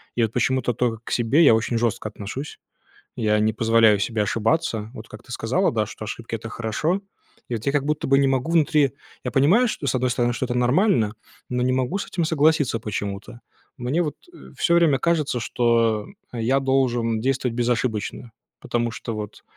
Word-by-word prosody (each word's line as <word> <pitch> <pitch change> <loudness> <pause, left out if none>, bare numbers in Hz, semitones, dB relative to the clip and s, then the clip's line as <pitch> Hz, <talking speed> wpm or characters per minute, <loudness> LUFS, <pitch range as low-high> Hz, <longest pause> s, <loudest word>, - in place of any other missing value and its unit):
и 120 - +1
вот 110 - -1
почему-то 125 0 +1
тока 115 -1 -1
к - - -8
себе 125 +7 +3
я 125 -7 +7
очень 115 +1 -1
жестко 115 -2 -1
отношусь. 105 +8 -7 0.6
Я 105 -1 +1
не 110 +1 +2
позволяю 110 -2 +4
себе 105 +1 0
ошибаться, 110 0 0
вот 110 -2 -10
как 110 - -11
ты 125 - -14
сказала, 125 +11 0
да, 110 -2 0
что: 110 - -8
"Ошибки- 115 +1 -5
это 115 0 -7
хорошо". 150 - -1 0.5
И 120 - -1
от 110 - -6
я 140 - +2
как 140 -1 0
будто 150 0 -1
бы 135 +1 +4
не 140 - +3
могу 135 +3 0
внутри 150 -4 +3 0.3
Я 125 - -3
понимаю, 180 - +4
что, 155 - -4
с - - +1
одной 130 0 +1
стороны, 120 -1 +1
что 130 - -2
это 120 - -3
нормально, 125 - +2 0.4
но 125 0 -1
не 130 0 +1
могу 130 +8 0
с 200 - -4
этим 170 - -2
согласиться 155 -5 +2
почему-то. 105 +2 -5 0.4
Мне 130 +7 0
вот, 150 - -3 0.2
э, 345 - -14
всё 170 - +3
время 165 -5 +4
кажется, 155 -7 0
что 115 -2 +1 0.3
я 125 +3 +1
должен 125 -4 +1
действовать 130 -1 -1
безошибочно, 120 -1 -1 0.3
потому 120 0 -1
что 115 0 -6
вот, 105 -1 -7
120 Hz, 195 wpm, -23 LUFS, 115-140 Hz, 0.6 s, я